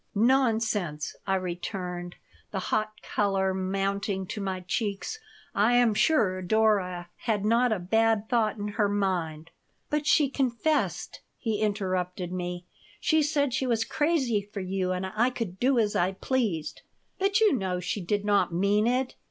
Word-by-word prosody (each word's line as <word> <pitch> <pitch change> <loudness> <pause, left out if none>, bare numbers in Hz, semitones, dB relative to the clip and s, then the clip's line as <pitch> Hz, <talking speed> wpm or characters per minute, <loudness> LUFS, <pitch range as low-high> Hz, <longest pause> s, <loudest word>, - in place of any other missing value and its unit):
"Nonsense!" 220 - +1
I 195 - +2
returned, 180 -1 -4 0.3
the 195 - -4 0.2
hot 215 0 -1
color 195 -2 0
mounting 195 +1 -1
to 210 - -4
my 190 -1 -3
cheeks. 200 - -3 0.3
"I 220 +4 +3
am 240 -3 +4
sure 200 -7 +2
Dora 185 -3 +1
had 210 -4 -1
not 235 +2 +3
a 215 - +2
bad 220 +3 +1
thought 225 -3 +1
in 205 0 -3
her 205 0 +1
mind 175 -6 -1 0.2
" - - -45
"But 300 0 0
she 295 -1 +5
confessed," 270 +3 -1 0.2
he 220 -4 -2
interrupted 185 -4 -1
me. 175 -1 -4 0.3
"She 315 -1 +3
said 285 -3 +1
she 265 0 0
was 230 -1 +1
crazy 295 -9 +1
for 200 0 -8
you 185 0 -1
and 185 +1 -2
I 215 +6 +1
could 210 -7 -5
do 260 +1 +3
as 215 -3 +2
I 180 +2 +2
pleased." 200 - -2 0.4
"But 395 +1 +2
you 435 -5 +5
know 190 -7 -1
she 185 +3 -3
did 205 +3 -1
not 205 -3 +3
mean 200 +5 +2
it. 255 +1 0
205 Hz, 160 wpm, -27 LUFS, 185-235 Hz, 0.4 s, she